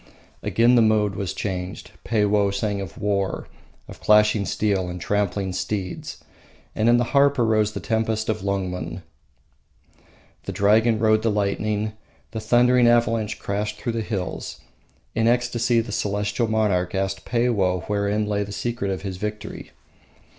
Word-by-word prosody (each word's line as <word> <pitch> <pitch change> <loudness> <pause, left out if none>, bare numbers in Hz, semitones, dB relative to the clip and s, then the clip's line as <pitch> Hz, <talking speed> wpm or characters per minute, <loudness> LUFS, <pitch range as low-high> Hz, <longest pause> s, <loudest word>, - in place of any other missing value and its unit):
Again 120 +2 +3
the 120 - +6
mode 105 -2 +3
was 95 -2 -3
changed; 90 -2 -5
Peiwoh 105 -2 +2
sang 100 0 -1
of 95 - -8
war, 100 -2 -1 0.4
of - - -12
clashing 105 -1 +4
steel 100 -4 0
and 90 0 -6
trampling 100 0 -1
steeds. 95 -1 -4 0.5
And 110 +2 +2
in 120 - +6
the 120 - +2
harp 140 0 +4
arose 110 -3 +2
the - - -4
tempest 110 -1 -1
of 110 - -1
Lungmen, 95 -2 -3 1.4
the - - -3
dragon 110 +4 +3
rode 110 0 +3
the 115 - +1
lightning, 105 +1 -1 0.4
the 110 - -4
thundering 120 +2 +4
avalanche 115 -2 +2
crashed 105 +1 -3
through 120 +2 -3
the 115 0 -2
hills. 100 -5 -4 0.5
In 115 0 +1
ecstasy 120 0 +2
the 115 -1 -7
Celestial 105 +2 -1
monarch 100 -5 +1
asked 95 0 -2
Peiwoh 105 -8 +1
wherein 105 +1 0
lay 105 -1 0
the 100 - -8
secret 115 -1 -3
of 95 0 -3
his 95 -2 -4
victory. 105 +2 -6
105 Hz, 145 wpm, -23 LUFS, 100-115 Hz, 1.4 s, the